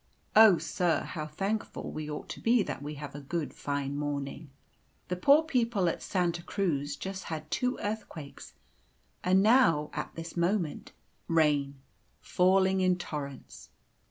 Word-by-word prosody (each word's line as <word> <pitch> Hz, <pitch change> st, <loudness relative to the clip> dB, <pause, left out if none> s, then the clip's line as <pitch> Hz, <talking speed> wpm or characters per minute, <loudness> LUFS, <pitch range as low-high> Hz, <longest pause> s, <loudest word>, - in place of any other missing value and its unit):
Oh, 215 Hz, -4 st, +8 dB
sir, 175 Hz, -1 st, 0 dB
how 155 Hz, -3 st, -5 dB
thankful 195 Hz, +8 st, -3 dB
we 155 Hz, -1 st, -5 dB
ought 150 Hz, -, -6 dB
to -, -, -6 dB
be 230 Hz, -1 st, +3 dB
that 140 Hz, -5 st, -5 dB
we 150 Hz, +1 st, -6 dB
have 145 Hz, 0 st, -8 dB
a 145 Hz, -, -7 dB
good, 160 Hz, +2 st, -3 dB
fine 140 Hz, -1 st, -3 dB
morning. 145 Hz, +1 st, -4 dB, 0.6 s
The 180 Hz, -, 0 dB
poor 280 Hz, -, +5 dB
people 235 Hz, -, +1 dB
at 170 Hz, -, -1 dB
Santa 175 Hz, -2 st, -1 dB
Cruz 150 Hz, -7 st, -1 dB
just 190 Hz, +3 st, -6 dB
had 155 Hz, -1 st, -6 dB
two 250 Hz, 0 st, 0 dB
earthquakes, 205 Hz, -9 st, -6 dB, 0.7 s
and 185 Hz, +2 st, +4 dB
now 210 Hz, -, +4 dB
at -, -, -5 dB
this 165 Hz, 0 st, -7 dB
moment 170 Hz, -2 st, -1 dB, 0.4 s
rain 150 Hz, -4 st, +2 dB, 0.4 s
falling 190 Hz, +1 st, +3 dB
in 185 Hz, -1 st, +3 dB
torrents." 145 Hz, -5 st, -7 dB
170 Hz, 145 wpm, -30 LUFS, 150-195 Hz, 0.7 s, Oh